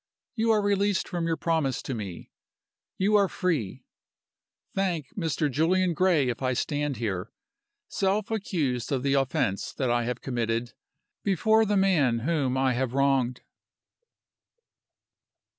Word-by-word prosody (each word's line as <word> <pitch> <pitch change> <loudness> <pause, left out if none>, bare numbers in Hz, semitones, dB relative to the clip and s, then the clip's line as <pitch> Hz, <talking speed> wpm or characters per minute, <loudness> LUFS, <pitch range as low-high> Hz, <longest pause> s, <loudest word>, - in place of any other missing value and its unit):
You 225 -2 0
are 215 -2 +3
released 200 -1 +1
from 170 -2 -2
your 165 -1 0
promise 160 -6 0
to 135 - -4
me 100 -7 -7 0.7
you 200 +3 +1
are 200 -1 +5
free. 160 - -2 0.9
Thank 175 -7 -2
Mr. 160 -5 0
Julian 170 +6 +2
Gray 165 -5 +3
if 120 +1 -4
I 130 -1 +1
stand 145 +1 -1
here 100 -5 -3 0.6
self 200 +2 0
accused 155 - -1
of 130 -2 0
the 140 -1 +2
offense, 135 -6 0
that 130 -3 -1
I 120 -1 +1
have 125 0 -3
committed, 115 -2 -2 0.5
before 220 +3 +3
the 205 0 +2
man 150 -12 +3
whom 135 -3 0
I 130 -1 +2
have 125 0 -1
wronged." 135 -3 +1
145 Hz, 135 wpm, -27 LUFS, 125-185 Hz, 0.9 s, are